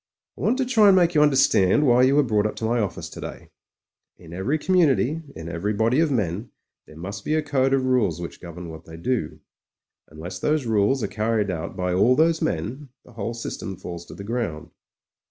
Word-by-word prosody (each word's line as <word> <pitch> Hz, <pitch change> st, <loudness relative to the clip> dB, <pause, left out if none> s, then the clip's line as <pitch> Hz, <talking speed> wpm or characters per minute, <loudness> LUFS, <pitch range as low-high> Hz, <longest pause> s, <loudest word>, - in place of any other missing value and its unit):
"I -, -, -12 dB
want 240 Hz, +4 st, +2 dB
to 265 Hz, -, 0 dB
try 225 Hz, -5 st, +4 dB
and 195 Hz, -, +7 dB
make 175 Hz, -2 st, +3 dB
you 150 Hz, -, +4 dB
understand 135 Hz, -4 st, +4 dB
why 125 Hz, -1 st, +5 dB
you 130 Hz, +2 st, +4 dB
were 145 Hz, -, +5 dB
brought 110 Hz, -4 st, +1 dB
up 105 Hz, -, -6 dB
to 110 Hz, -, -4 dB
office 110 Hz, -4 st, -1 dB
today. -, -, -9 dB, 0.7 s
In 85 Hz, -2 st, -13 dB
every 100 Hz, -, -1 dB
com 185 Hz, +4 st, 0 dB
mimity 155 Hz, -1 st, +2 dB
— -, -, -32 dB
in 80 Hz, -, -7 dB
every 85 Hz, +6 st, -2 dB
body 115 Hz, +6 st, +2 dB
of 165 Hz, -1 st, +3 dB
men 105 Hz, -, -2 dB, 0.2 s
— -, -, -58 dB
^there 75 Hz, -, -14 dB
must 100 Hz, +5 st, -7 dB
be 155 Hz, -, 0 dB
a 155 Hz, -, +1 dB
code 135 Hz, -3 st, +1 dB
of 135 Hz, -1 st, +2 dB
rules 110 Hz, -10 st, +1 dB
which 85 Hz, -, -8 dB
govern 85 Hz, 0 st, -8 dB
what 80 Hz, -1 st, -10 dB
they 80 Hz, 0 st, -11 dB
do. 125 Hz, +8 st, -2 dB, 0.7 s
Unless 85 Hz, +4 st, -8 dB
those 150 Hz, +2 st, 0 dB
rules 110 Hz, +3 st, +1 dB
are -, -, 0 dB
carried 110 Hz, -2 st, -1 dB
out 85 Hz, -2 st, -5 dB
by 90 Hz, 0 st, -1 dB
all 115 Hz, +8 st, +4 dB
those 160 Hz, +2 st, +2 dB
men, 125 Hz, -, -3 dB, 0.2 s
the 125 Hz, -, -17 dB
whole 115 Hz, +1 st, -4 dB
system 100 Hz, -4 st, -6 dB
falls 85 Hz, -1 st, -7 dB
to -, -, -10 dB
the 100 Hz, -, -8 dB
ground. 105 Hz, -9 st, -4 dB
115 Hz, 220 wpm, -24 LUFS, 90-140 Hz, 0.7 s, and